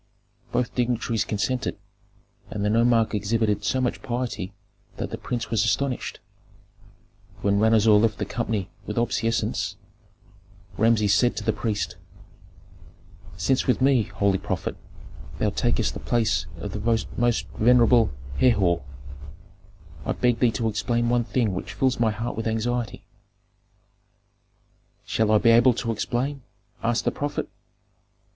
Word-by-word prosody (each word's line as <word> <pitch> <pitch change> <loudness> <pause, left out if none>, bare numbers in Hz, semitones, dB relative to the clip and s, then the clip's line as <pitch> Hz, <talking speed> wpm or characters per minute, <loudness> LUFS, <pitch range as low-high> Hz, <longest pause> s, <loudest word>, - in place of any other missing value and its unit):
Both 120 0 -1
dignitaries 120 -2 0
consented, 110 +5 -2 0.7
and 105 -1 -3
the 105 - +2
nomarch 115 0 +3
exhibited 105 0 0
so 130 +5 0
much 125 -2 -1
piety 120 -6 -3 0.5
that - - -4
the - - -4
prince 120 -2 -4
was 110 -3 +2
astonished. 140 -3 -1 1.2
When 100 0 +2
Ranuzer 110 0 +4
left 105 +1 +4
the - - -2
company 110 -5 -3 0.2
with 105 - -4
obeisances, 115 -1 0 1.0
Rameses 110 -2 +3
said 120 -1 +2
to - - -3
the 110 - +1
priest, 105 -1 -2 1.4
"Since 130 +12 +1
with 125 - +2
me, 135 -2 +4
holy 95 0 0
prophet, - - -3 0.6
thou - - +1
takest - - 0
the - - -6
place 105 -7 0
of 105 - -6
the 105 - -4 0.4
most 120 -1 +1
venerable 120 -1 +4 0.3
Herhor, 100 -9 +3 1.2
I - - -1
beg 120 -2 +1
thee 125 - +4
to 115 - -1
explain 120 +2 0
one 120 -1 +2
thing 110 -2 0
which 90 - -5
fills 130 -2 +1
my 115 -2 +3
heart 110 +2 -3
with 115 0 -3
anxiety 115 +1 -2 1.0
" - - -42
"Shall 110 -1 +1
I 110 - +6
be 115 +2 +4
able 120 +1 +5
to 115 -1 -2
explain?" 130 +5 -2 0.4
asked 115 +1 0
the - - +2
prophet. 145 0 -3
115 Hz, 135 wpm, -25 LUFS, 105-120 Hz, 1.4 s, I